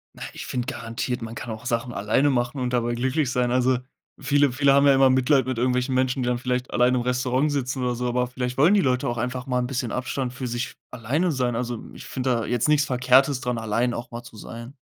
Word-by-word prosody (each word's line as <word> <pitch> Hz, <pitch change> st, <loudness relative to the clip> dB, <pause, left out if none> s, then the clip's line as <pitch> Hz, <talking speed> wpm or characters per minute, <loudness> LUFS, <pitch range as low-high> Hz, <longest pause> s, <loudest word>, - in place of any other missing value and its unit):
Na, -, -, -14 dB
ich -, -, -7 dB
finde 125 Hz, -1 st, -3 dB
garantiert, 115 Hz, +1 st, -4 dB
man 115 Hz, -, -6 dB
kann 120 Hz, -, -7 dB
auch 110 Hz, +2 st, -8 dB
Sachen 120 Hz, 0 st, -1 dB
alleine 110 Hz, +8 st, +1 dB
machen 125 Hz, +1 st, -1 dB
und 125 Hz, 0 st, -1 dB
dabei 120 Hz, -1 st, 0 dB
glücklich 130 Hz, +3 st, 0 dB
sein. 125 Hz, -1 st, +1 dB
Also 125 Hz, 0 st, +2 dB, 0.4 s
viele 145 Hz, -2 st, +2 dB
viele 140 Hz, +2 st, +3 dB
haben 140 Hz, +1 st, +5 dB
ja 140 Hz, -, +7 dB
immer 135 Hz, 0 st, +5 dB
Mitleid 130 Hz, 0 st, +3 dB
mit 130 Hz, -2 st, -2 dB
irgendwelchen 125 Hz, +2 st, 0 dB
Menschen, 130 Hz, +1 st, +1 dB
die 120 Hz, -, -1 dB
dann 125 Hz, -1 st, +1 dB
vielleicht 125 Hz, +1 st, -2 dB
alleine 125 Hz, +1 st, +3 dB
im -, -, -1 dB
Restaurant 125 Hz, +3 st, +1 dB
sitzen 130 Hz, -2 st, -2 dB
oder 125 Hz, -1 st, 0 dB
so, 125 Hz, +1 st, -2 dB
aber 125 Hz, 0 st, 0 dB
vielleicht 125 Hz, +1 st, -4 dB
wollen 175 Hz, +8 st, +6 dB
die 200 Hz, -, +4 dB
Leute 125 Hz, -3 st, +1 dB
auch 120 Hz, 0 st, -2 dB
einfach 125 Hz, +2 st, -3 dB
mal 125 Hz, -1 st, 0 dB
'n 125 Hz, -, 0 dB
bisschen 125 Hz, -2 st, -3 dB
Abstand 130 Hz, 0 st, -2 dB
für 130 Hz, 0 st, -6 dB
sich 120 Hz, 0 st, -2 dB
f -, -, -14 dB, 0.2 s
alleine 140 Hz, +9 st, 0 dB
sein. 125 Hz, -4 st, -1 dB
Also, 120 Hz, -1 st, -3 dB
ich -, -, -10 dB
finde 130 Hz, 0 st, -3 dB
da 115 Hz, -3 st, +1 dB
jetzt 120 Hz, +1 st, 0 dB
nichts 145 Hz, -1 st, +4 dB
Verkehrtes 130 Hz, +1 st, +3 dB
dran, 125 Hz, -1 st, -2 dB
allein 115 Hz, +2 st, 0 dB
auch 120 Hz, -, -7 dB
mal 120 Hz, 0 st, -6 dB
zu 115 Hz, -2 st, -14 dB
sein. 115 Hz, +5 st, -9 dB
125 Hz, 250 wpm, -24 LUFS, 120-130 Hz, 0.4 s, ja